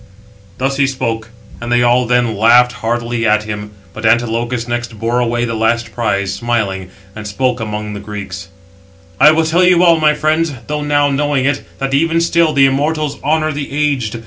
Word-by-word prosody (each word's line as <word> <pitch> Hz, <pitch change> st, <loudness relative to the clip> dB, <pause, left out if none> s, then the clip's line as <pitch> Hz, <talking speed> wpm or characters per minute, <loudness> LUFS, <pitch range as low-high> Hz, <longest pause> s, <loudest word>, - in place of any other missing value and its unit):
Thus 135 Hz, +1 st, -1 dB
he 140 Hz, -1 st, +3 dB
spoke; 115 Hz, -4 st, -3 dB, 0.3 s
and 120 Hz, 0 st, -5 dB
they 120 Hz, 0 st, +3 dB
all 120 Hz, 0 st, +3 dB
then 120 Hz, -2 st, +1 dB
laughed 120 Hz, +4 st, +5 dB
heartily 115 Hz, 0 st, -2 dB
at 110 Hz, 0 st, +2 dB
him. 105 Hz, -1 st, -6 dB, 0.2 s
But 110 Hz, -, -9 dB
Antilochus 120 Hz, +1 st, 0 dB
next 120 Hz, -1 st, -4 dB
bore 115 Hz, +3 st, -1 dB
away 120 Hz, 0 st, 0 dB
the 115 Hz, -, -3 dB
last 115 Hz, 0 st, -1 dB
prize, 100 Hz, -4 st, -1 dB
smiling, 100 Hz, -4 st, -2 dB, 0.3 s
and 105 Hz, -1 st, -7 dB
spoke 125 Hz, +4 st, -1 dB
among 105 Hz, -1 st, -4 dB
the 100 Hz, -, -6 dB
Greeks: 100 Hz, -2 st, -7 dB, 0.7 s
"I 150 Hz, -, +8 dB
will 160 Hz, +1 st, +2 dB
tell 170 Hz, +3 st, +2 dB
you 180 Hz, -1 st, +4 dB
all, 170 Hz, -2 st, +5 dB
my 150 Hz, -1 st, +3 dB
friends, 155 Hz, +1 st, 0 dB
though 150 Hz, 0 st, -3 dB
now 145 Hz, -1 st, +1 dB
knowing 140 Hz, -1 st, 0 dB
it, 145 Hz, 0 st, 0 dB
that 135 Hz, 0 st, -3 dB
even 165 Hz, +4 st, +2 dB
still 170 Hz, -1 st, +2 dB
the 140 Hz, -2 st, +4 dB
immortals 145 Hz, +2 st, -1 dB
honour 155 Hz, +1 st, 0 dB
the 145 Hz, -1 st, -5 dB
aged. 140 Hz, -6 st, -1 dB
120 Hz, 185 wpm, -15 LUFS, 115-145 Hz, 0.7 s, I